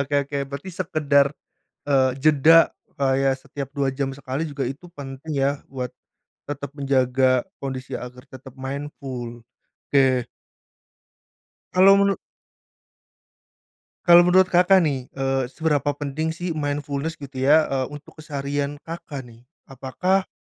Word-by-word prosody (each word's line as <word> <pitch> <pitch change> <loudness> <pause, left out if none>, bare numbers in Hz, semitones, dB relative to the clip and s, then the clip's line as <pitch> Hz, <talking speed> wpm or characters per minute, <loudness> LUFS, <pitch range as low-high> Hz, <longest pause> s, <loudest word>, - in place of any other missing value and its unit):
Oke 140 +1 -4
oke 145 - -3
berarti 140 +6 -7
sekedar, 150 -5 +2 0.6
e - - +1 0.3
jeda 155 +3 +6 0.3
kayak 135 0 +2
setiap 140 0 -7
2 140 -2 0
jam 135 0 -2
sekali 135 +2 -4
juga 145 -3 -3
itu 145 +7 -8
penting 140 0 -8
ya, 140 0 0
buat 130 -2 -3 0.6
tetap 140 -1 -5
menjaga 130 -2 +2 0.2
kondisi 130 -2 -4
agar 125 +1 -9
tetap 130 -1 -12
mindful, 130 -3 -6 0.5
oke. 130 -3 +3 1.5
Kalau 195 +2 +7
menu 200 0 +3 1.9
Kalau 175 -1 +9
menurut 185 +1 +4
Kakak 180 +1 +5
nih, 135 -5 -1
e 135 -1 0
seberapa 145 0 0
penting 150 +3 -3
sih 175 +1 -3
mindfulness 145 0 -3
gitu 135 -2 -9
ya? 150 +4 +5
E 135 - +1
untuk 145 +2 -12
keseharian 145 -1 -3
Kakak 160 -4 -7
nih? 120 0 -17 0.2
Apakah 165 +9 -1
140 Hz, 125 wpm, -23 LUFS, 135-155 Hz, 1.9 s, Kalau